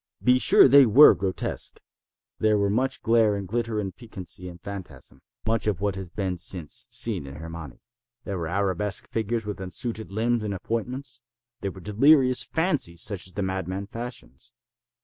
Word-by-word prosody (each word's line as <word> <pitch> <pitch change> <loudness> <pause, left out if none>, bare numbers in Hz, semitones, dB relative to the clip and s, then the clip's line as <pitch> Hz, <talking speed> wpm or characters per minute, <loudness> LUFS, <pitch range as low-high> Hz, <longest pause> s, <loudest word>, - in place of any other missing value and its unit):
Be 125 0 +5
sure - - +7
they 135 0 +7
were 135 +8 +8
grotesque. 95 0 -3 0.6
There 110 -1 +3
were 100 -1 +1
much 130 +5 -1
glare 115 -2 +3
and 100 -1 -5
glitter 115 +1 -2
and 95 -3 -4
piquancy 95 -6 -8
and 90 0 -12
phantasm—much 100 +4 -5
of 105 -5 0
what 100 -1 -1
has 95 -2 -6
been 95 -1 -3
since 85 -3 -3
seen 70 - 0
in 70 - -9
"Hernani." 80 -3 -9 0.4
There 100 -3 -4
were 85 - -3
arabesque 100 +2 -1
figures 110 0 -1
with 105 -2 -5
unsuited 110 +3 -4
limbs 115 +3 0
and 105 -2 -3
appointments. 125 +5 -4 0.4
There 100 - -3
were 95 - -12
delirious 130 - +4
fancies 150 - 0
such 100 -4 -2
as 90 - -11
the 100 - -2
madman 95 +1 -3
fashions. 115 - -8
100 Hz, 165 wpm, -25 LUFS, 95-115 Hz, 0.6 s, were